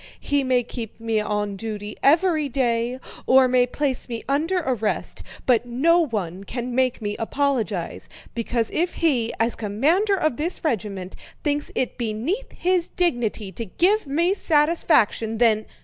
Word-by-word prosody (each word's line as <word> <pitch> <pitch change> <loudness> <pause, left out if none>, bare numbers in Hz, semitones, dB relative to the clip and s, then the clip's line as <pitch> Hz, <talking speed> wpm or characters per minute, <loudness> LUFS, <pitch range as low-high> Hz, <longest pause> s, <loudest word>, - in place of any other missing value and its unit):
He 285 -1 0
may 255 -1 +2
keep 230 -2 -7
me 225 -1 0
on 210 -1 -2
duty 210 0 -5
every 310 0 +3
day, 245 -1 0 0.3
or 260 0 +6
may 250 0 +3
place 265 0 -2
me 230 -1 -4
under 310 +7 +1
arrest, 250 - -2 0.2
but 245 -1 +3
no 310 +9 +3
one 195 -6 -4
can 245 +4 -5
make 255 -2 +1
me 205 0 -2
apologize, 225 -8 -1 0.2
because 230 -1 -1
if 345 +2 0
he, 255 -9 +1
as 230 +1 +2
commander 300 - +1
of 310 -9 0
this 335 +4 -3
regiment, 200 - -2 0.3
thinks 290 -1 -1
it 255 - -2
beneath 240 - -2
his 360 -1 0
dignity 240 - -1
to 230 +5 -5
give 370 - +2
me 335 +7 +2
satisfaction, 295 - +2
then..." 220 -2 +3
245 Hz, 150 wpm, -23 LUFS, 225-300 Hz, 0.3 s, or